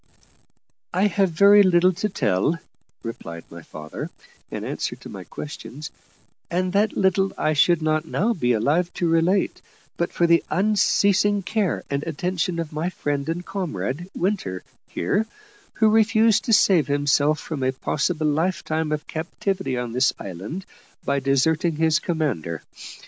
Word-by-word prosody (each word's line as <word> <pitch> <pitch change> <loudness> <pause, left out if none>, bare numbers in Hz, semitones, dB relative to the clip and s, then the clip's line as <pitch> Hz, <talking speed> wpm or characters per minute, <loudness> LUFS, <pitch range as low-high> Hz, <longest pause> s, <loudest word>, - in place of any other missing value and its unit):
"I 190 +3 +3
have 195 -1 +2
very 200 +5 +6
little 185 -1 +4
to 210 +5 -2
tell," 125 - +1 0.5
replied 85 -8 -7
my 85 0 -9
father, 75 0 -7 0.4
in - - -5
answer - - -3
to - - -12
my - - -8
questions; 150 0 -8 0.6
"and 180 +1 -1
that 205 +1 +1
little 190 0 +2
I 155 - +1
should 160 +2 +3
not 155 0 0
now 220 +8 +1
be 125 - +1
alive 150 +11 +1
to 175 - 0
relate, 165 +4 +1 0.4
but 170 - -1
for 170 - +1
the 170 0 +4
unceasing 205 0 +2
care 205 -1 -1
and 140 0 0
attention 170 +2 -2
of 165 -2 -4
my 160 +4 -1
friend 145 -4 -3
and 175 +2 -3
comrade, 170 - -4
Winter, 175 - -2 0.2
here, 210 - -1 0.5
who 220 - +3
refused 220 0 +4
to - - 0
save 180 -8 +5
himself 145 +1 +2
from 155 -4 -5
a 130 0 +2
possible 155 +4 -1
lifetime 160 0 0
of 150 -1 -2
captivity 170 -2 -3
on 125 -1 -3
this 125 +2 +2
island 100 - -7 0.4
by 140 0 +1
deserting 150 +5 +1
his 160 0 +2
commander. 130 - -2
165 Hz, 150 wpm, -23 LUFS, 140-190 Hz, 0.6 s, very